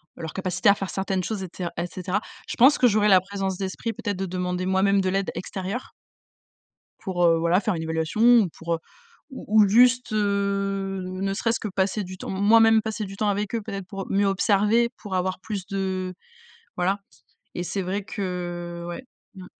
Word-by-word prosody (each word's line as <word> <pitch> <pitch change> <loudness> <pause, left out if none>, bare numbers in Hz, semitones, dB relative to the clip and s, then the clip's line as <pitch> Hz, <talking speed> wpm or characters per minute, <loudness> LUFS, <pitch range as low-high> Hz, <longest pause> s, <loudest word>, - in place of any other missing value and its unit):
leur 160 -2 -6
capacité 185 0 +1
à - - +8
faire 195 -1 -5
certaines 190 -1 -1
choses 205 0 -3
et 185 - -6
ce 185 - -4
et 170 - -1
cetera. 185 +3 -3 0.3
Je - - -4
pense 265 +5 +6
que 250 - +5
j'aurais 210 -1 +3
la 190 -2 +7
présence 195 0 -3
d'esprit 195 +4 -3
peut-être 225 -2 -4
de 195 - -2
demander 180 0 -2
moi-même 195 +1 +3
de 190 - 0
l'aide 195 +1 -1
extérieure. 190 +6 -5 1.1
Pour, 180 -3 -1
heu, 165 -1 +5
voilà, 170 +3 +2
faire 210 -1 -1
une 165 - -3
évaluation 160 +4 -2
ou 235 -4 +6
pour, 165 +1 -4
heu, - - -2 0.5
ou 220 -5 +2
ou - - +5
juste, 245 +3 +4
heu, 200 -2 0
ne 185 +1 -3
serait-ce 230 +3 0
que 215 - -3
passer 195 +2 -1
du 185 0 -9
temps, - - -7
moi-même, 220 +3 +5
passer 220 -1 -3
du 195 0 -8
temps 210 +1 0
avec 205 +2 -2
eux, 230 - -1
peut-être, 195 -3 -6
pour 195 -1 -6
mieux 200 +1 +2
observer, 210 +4 +3
pour 205 -3 -6
avoir 185 +1 -1
plus 200 -2 -5
de 190 -2 -3 0.6
voilà 190 +3 +1 0.6
et 175 - -2
c'est 195 +2 -3
vrai 190 +3 -2
que, 175 -4 -5
ouais, 175 +9 -7 0.3
mmh. 185 -1 -10
195 Hz, 195 wpm, -25 LUFS, 185-210 Hz, 1.1 s, à